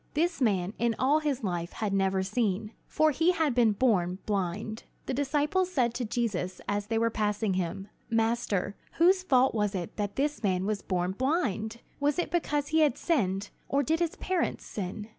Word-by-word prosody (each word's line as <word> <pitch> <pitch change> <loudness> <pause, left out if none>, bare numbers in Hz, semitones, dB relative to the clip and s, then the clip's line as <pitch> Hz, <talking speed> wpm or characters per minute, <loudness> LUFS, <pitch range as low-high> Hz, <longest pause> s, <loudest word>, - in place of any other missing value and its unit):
This 335 0 +1
man 195 -5 +1
in 235 -1 +1
all 285 +4 +3
his 285 -5 -2
life 175 -3 -2
had 210 -3 -2
never 190 -1 +2
seen; 210 0 -1 0.2
for 310 0 +3
he 325 +6 +3
had 320 -6 +1
been 235 -3 +4
born 190 -6 +2
blind. 205 +2 -2 0.2
The - - -2
disciples 295 +7 +1
said 245 -8 +1
to 245 - -2
Jesus 210 -5 -2
as 205 0 -1
they 225 +1 0
were 230 0 +2
passing 210 -1 0
him: 185 +2 -2 0.2
"Master, 225 -4 0 0.2
whose 370 +3 +4
fault 265 -7 +3
was 210 -2 0
it 175 -3 -5
that 205 -1 -2
this 295 +2 -1
man 190 -3 +1
was 210 -1 -1
born 180 -1 -1
blind? 235 - -1 0.2
Was 290 0 +1
it 350 - -1
because 295 -4 0
he 320 +1 +3
has 300 -5 +3
sinned, 205 - 0 0.2
or 280 +1 +2
did 320 +5 +1
his 340 -2 0
parents 370 -2 -1
sin?" 205 +1 -5
225 Hz, 185 wpm, -29 LUFS, 195-290 Hz, 0.2 s, been